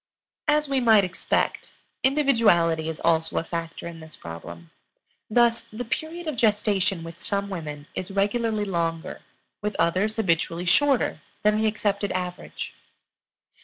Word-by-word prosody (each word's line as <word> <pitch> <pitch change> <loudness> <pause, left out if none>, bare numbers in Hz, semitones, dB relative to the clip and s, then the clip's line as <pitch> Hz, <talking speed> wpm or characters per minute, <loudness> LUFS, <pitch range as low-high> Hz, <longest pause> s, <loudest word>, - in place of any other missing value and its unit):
As 300 0 +3
we 275 -1 +1
might 220 -4 +6
expect, 180 -1 -1 0.3
individuality 220 - +3
is 160 - -5
also 160 -1 +2
a - - +1
factor 165 0 -5
in 170 -1 -7
this 160 0 -11
problem. 85 0 -9 0.6
Thus, 235 +1 +4
the 235 +3 -5
period 315 +8 -4
of 310 -3 -2
gestation 205 -5 +2
with 165 0 -9
some 200 0 -2
women 150 -5 -5
is 185 - -4
regularly 210 +2 0
longer, 165 -3 -2 0.4
with 210 0 -2
others 190 +6 +2
habitually 170 -4 0
shorter 270 - +3 0.2
than 210 +1 +3
the 220 - +3
accepted 205 -1 0
average. 180 -1 -4
200 Hz, 135 wpm, -25 LUFS, 165-225 Hz, 0.6 s, might